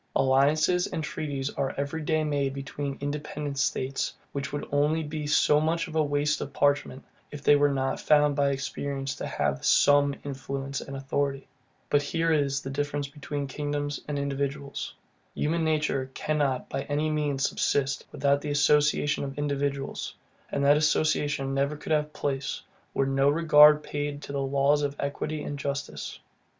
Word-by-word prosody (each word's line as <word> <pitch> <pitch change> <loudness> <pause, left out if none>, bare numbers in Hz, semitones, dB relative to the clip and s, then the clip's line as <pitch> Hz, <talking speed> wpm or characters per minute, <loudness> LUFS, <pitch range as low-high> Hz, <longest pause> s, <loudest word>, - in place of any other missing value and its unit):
Alliances 150 +7 +3
and 160 - -4
treaties 140 -2 -3
are 135 - -2
every 140 +3 -2
day 155 +1 +1
made 140 -3 -1
between 140 0 -4
independent 145 -1 -4
states, 135 0 -1 0.2
which 140 -1 -4
would 145 - -4
only 150 +3 +2
be 150 0 -4
so 150 0 +4
much 165 +2 0
waste 150 -2 0
of 140 - -5
parchment, 145 -2 +1 0.2
if 145 -1 -9
they 145 - +6
were 145 0 +4
not 135 -1 -1
found 150 -1 +4
by 140 -1 +2
experience 140 0 -3
to - - -5
have 70 0 -1
SOME 145 -1 +4
influence 140 0 -4
and 135 0 -7
authority. 135 0 -2 0.4
But 145 - +3
here 165 +3 0
is 140 -2 +1
the 135 - -5
difference 145 0 -2
between 145 0 -5
kingdoms 145 +1 -3
and 150 -1 -2
individuals. 140 0 -3 0.4
Human 165 +2 0
nature 150 -4 0
cannot 145 -4 0
by - - -3
any 150 +2 0
means 145 -3 0
subsist, 140 0 0
without 140 0 +1
the 150 - -4
association 145 0 +3
of 135 0 -6
individuals; 140 -1 -2 0.4
and 140 - 0
that 145 +1 +6
association 150 -2 +1
never 140 +2 0
could 155 - -7
have 150 -1 +1
place, 140 -2 -3 0.3
were 135 - +2
no 135 +1 +3
regard 150 -1 +6
paid 145 0 -4
to - - -7
the 140 -1 -1
laws 140 +2 +2
of 145 -1 -1
equity 145 +2 -3
and 145 -1 -5
justice. 140 0 -4
145 Hz, 160 wpm, -27 LUFS, 140-150 Hz, 0.4 s, they